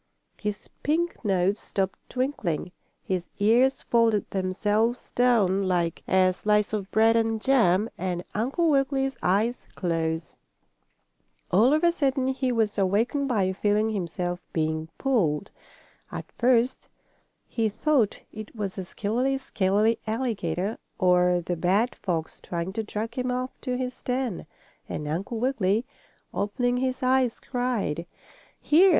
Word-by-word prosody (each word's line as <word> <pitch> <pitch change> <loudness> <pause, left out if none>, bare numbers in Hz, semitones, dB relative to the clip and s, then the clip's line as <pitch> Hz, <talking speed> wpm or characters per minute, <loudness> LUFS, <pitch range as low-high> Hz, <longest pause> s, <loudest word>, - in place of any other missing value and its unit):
His 210 -1 -4
pink 335 +1 0
nose 195 0 +1
stopped 190 -1 -2
twinkling, 235 - -2 0.3
his 180 -2 -2
ears 240 +6 +3
folded 230 -3 +2
themselves 205 +5 0
down 200 -6 +3
like 170 -3 0
a 185 -1 +4
slice 210 +2 +1
of 200 -2 -2
bread 225 +1 +4
and 225 -1 +1
jam, 215 -6 +3
and 180 -1 -2
Uncle 265 +10 +1
Wiggily's 270 -1 +1
eyes 215 +6 +1
closed. 165 -2 -2 1.1
All 220 +8 +5
of 310 +2 +2
a 340 - +6
sudden 270 -5 0
he 260 -1 0
was 220 -3 0
awakened 225 +9 +1
by 195 -7 +1
feeling 210 +3 +1
himself 175 -2 -2
being 160 0 -1
pulled. 200 - +1 0.6
At - - -7
first 245 +1 +2 0.6
he 225 -2 0
thought 240 0 +1 0.2
it 215 +1 -9
was 200 -3 -3
the 190 - -3
skillery 240 +9 -1
scalery 215 -2 +1
alligator, 215 -5 -2 0.2
or 180 -2 +3
the 175 - -1
bad 195 +8 +2
fox 165 -4 -3
trying 170 +2 -4
to 225 - -1
drag 220 +1 -4
him 250 +1 -2
off 255 +1 -2
to 250 -2 -2
his 255 -1 -4
den, 250 -9 -2 0.4
and 150 - -4
Uncle 190 +9 -3
Wiggily, 225 -3 +1 0.5
opening 245 +5 0
his 255 0 -1
eyes, 255 -2 +2
cried: 235 - -2 0.5
"Here! 350 +6 +5
215 Hz, 130 wpm, -26 LUFS, 185-250 Hz, 1.1 s, a